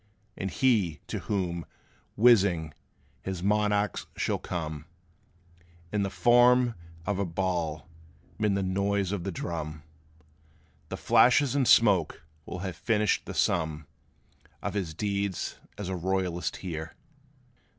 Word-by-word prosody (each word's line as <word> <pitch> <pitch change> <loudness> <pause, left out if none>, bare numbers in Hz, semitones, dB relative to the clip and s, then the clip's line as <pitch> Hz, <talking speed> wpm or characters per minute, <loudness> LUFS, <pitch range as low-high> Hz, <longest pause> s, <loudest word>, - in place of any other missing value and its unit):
And 95 - -3
he, 95 - +2
to - - -4
whom, 90 -4 -2 0.5
whizzing, 100 -9 +4 0.5
his 90 +4 -5
monarch 105 -1 +1 0.2
shall - - 0
come, 75 -4 -5 1.1
In 105 - 0
the 100 - 0
form 120 +2 +5 0.3
of 100 -1 -1
a - - +2
ball, 85 -4 -2 0.5
'mid 105 -2 +2
the 100 - 0
noise 100 +1 0
of 100 -4 -3
the 95 - -2
drum, 75 -3 -5 1.1
The - - -4
flashes 130 +2 +4
and 140 -3 +2
smoke, 100 -11 +4 0.2
will 90 - -5
have 90 -4 -5
finished 105 -3 +1
the - - -6
sum 80 -3 0 0.8
Of - - -2
his 90 -7 -3
deeds 100 -1 -2 0.2
as 105 - -5
a 95 - -2
royalist 90 -3 -1
here!" 80 -2 -5
95 Hz, 125 wpm, -28 LUFS, 85-105 Hz, 1.1 s, form